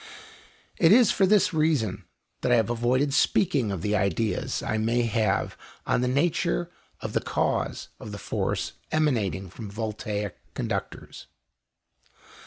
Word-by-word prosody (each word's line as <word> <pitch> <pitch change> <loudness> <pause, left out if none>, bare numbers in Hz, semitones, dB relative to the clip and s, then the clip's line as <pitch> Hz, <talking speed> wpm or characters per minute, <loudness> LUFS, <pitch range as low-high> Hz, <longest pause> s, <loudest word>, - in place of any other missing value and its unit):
It 165 - +6
is 235 0 +6
for 190 - +3
this 205 -2 +4
reason 150 - +1 0.4
that 125 - +1
I - - +6
have 115 -1 +2
avoided 125 +4 +1
speaking 135 - +2
of 95 -4 -4
the 105 0 +1
ideas 100 +2 -1
I 110 - -1
may 115 +2 +1
have 110 -1 0 0.3
on - - +1
the 125 - +1
nature 135 - 0 0.3
of - - -5
the - - +1
cause - - -1
of 105 - -8
the 100 - -6
force - - -2 0.2
emanating 110 - 0
from 105 +1 -8
voltaic 105 -1 -4 0.2
conductors." - - -5
115 Hz, 140 wpm, -26 LUFS, 105-145 Hz, 0.4 s, It